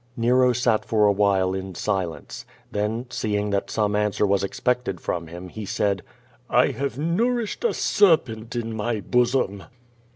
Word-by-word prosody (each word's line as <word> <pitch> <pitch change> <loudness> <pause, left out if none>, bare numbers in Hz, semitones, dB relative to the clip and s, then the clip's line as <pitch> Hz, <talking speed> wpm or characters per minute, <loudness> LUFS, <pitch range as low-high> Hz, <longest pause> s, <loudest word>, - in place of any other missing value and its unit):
Nero 125 +2 +4
sat 120 -2 +1
for 105 -2 +2
a 105 - +5
while 95 -2 +2
in 95 -1 -5
silence. 95 -4 -3 0.3
Then 105 +4 -2
seeing 105 -3 -1
that 100 0 -1
some 105 -2 0
answer 105 0 +1
was 100 -1 +1
expected 120 -1 -1
from 85 -1 -3
him, 90 +2 -9
he 110 +4 -7
said: 100 -1 0 0.5
"I - - +4
have 135 +1 -3
nourished 220 - 0
a 475 - +3
serpent 120 - +2
in 115 -1 -3
my 110 0 -2
bosom." 120 -3 +1
105 Hz, 155 wpm, -24 LUFS, 100-125 Hz, 0.5 s, a